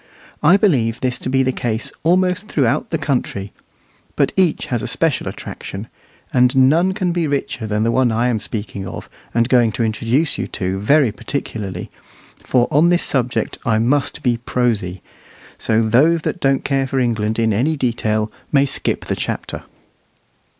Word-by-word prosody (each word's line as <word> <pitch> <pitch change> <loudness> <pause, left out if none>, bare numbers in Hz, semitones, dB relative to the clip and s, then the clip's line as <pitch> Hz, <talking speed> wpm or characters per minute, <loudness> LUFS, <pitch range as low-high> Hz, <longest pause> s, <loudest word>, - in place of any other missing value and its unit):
I 165 +6 +6
believe 125 - +2
this 125 -1 -1
to - - -4
be 135 0 +2
the 130 - +1
case 115 -3 -3
almost 185 +4 +1
throughout 140 - 0
the 165 - 0
country, 120 -9 -2 0.6
but - - +2
each 185 -5 +2
has 120 - 0
a 125 - -3
special 140 +4 0
attraction, 100 +3 -7 0.5
and 125 +1 +4
none 160 +8 +4
can 185 -4 0
be 170 -2 0
richer 135 -5 -2
than 105 0 0
the 115 - +2
one 125 -1 +2
I 115 +2 +1
am 120 -3 0
speaking 100 -3 -5
of - - -7 0.3
and 115 0 +3
going 120 -3 +4
to 115 - -1
introduce 115 +7 +1
you - - -2
to 95 -1 -3
very 135 +3 +3
particularly, 105 -4 -5 0.4
for 125 -1 +1
on 155 +5 +4
this 175 0 +2
subject 125 -3 -1
I 110 -3 +2
must 135 +6 0
be 120 -3 +2
prosy; 115 -7 -1 0.6
so 110 0 +2
those 150 +9 +3
that - - -2
don't 135 -3 +1
care 135 -1 +1
for 135 0 -1
England 110 -3 0
in 115 -1 +2 0.3
detail 110 -4 0 0.2
may 140 -1 +4
skip 135 - -1
the - - -1
chapter. - - -4
125 Hz, 170 wpm, -19 LUFS, 110-145 Hz, 0.6 s, I